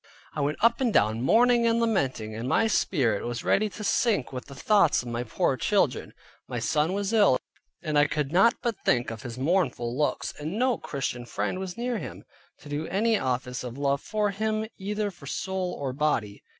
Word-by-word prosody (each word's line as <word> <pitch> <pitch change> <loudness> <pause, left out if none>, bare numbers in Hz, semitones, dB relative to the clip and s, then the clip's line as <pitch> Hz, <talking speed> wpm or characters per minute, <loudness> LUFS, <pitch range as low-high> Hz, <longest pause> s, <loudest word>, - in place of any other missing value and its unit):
I 150 - -3
went 145 +2 0
up 235 +2 +4
and 245 -3 +2
down 110 - +2
mourning 235 - +4
and 230 0 +2
lamenting; 135 - 0
and 115 +4 -4
my 225 - +3
spirit 130 - +1
was 120 -1 -4
ready 215 +1 +2
to 210 - -8
sink 205 - +1
with 125 - -5
the 140 - -11
thoughts 185 - +3
of 120 - -7
my 120 0 -2
poor 115 - 0
children. - - 0 0.3
My 125 - -4
son 150 +9 +1
was 200 +2 -2
ill, 205 - +5 0.5
and 155 -3 +1
I 145 - +5
could 150 -2 -2
not 195 +7 +5
but 230 -4 -1
think 120 -2 +1
of 115 -1 -7
his 120 -1 -7
mournful 135 -5 0
looks, 150 +2 -1
and 155 +7 -4
no 250 -2 +1
Christian 135 -5 -4
friend 105 - -2
was 190 0 -5
near 240 -1 -2
him, - - -8 0.4
to - - -13
do 150 +2 -3
any 220 +3 +1
office 125 0 -2
of 125 0 -7
love 140 0 0
for 210 -1 -1
him, 215 +2 -1
either 205 +1 -2
for 175 - -13
soul 190 -1 -3
or 135 -2 -3
body. 125 -8 -1
155 Hz, 200 wpm, -27 LUFS, 125-210 Hz, 0.5 s, ill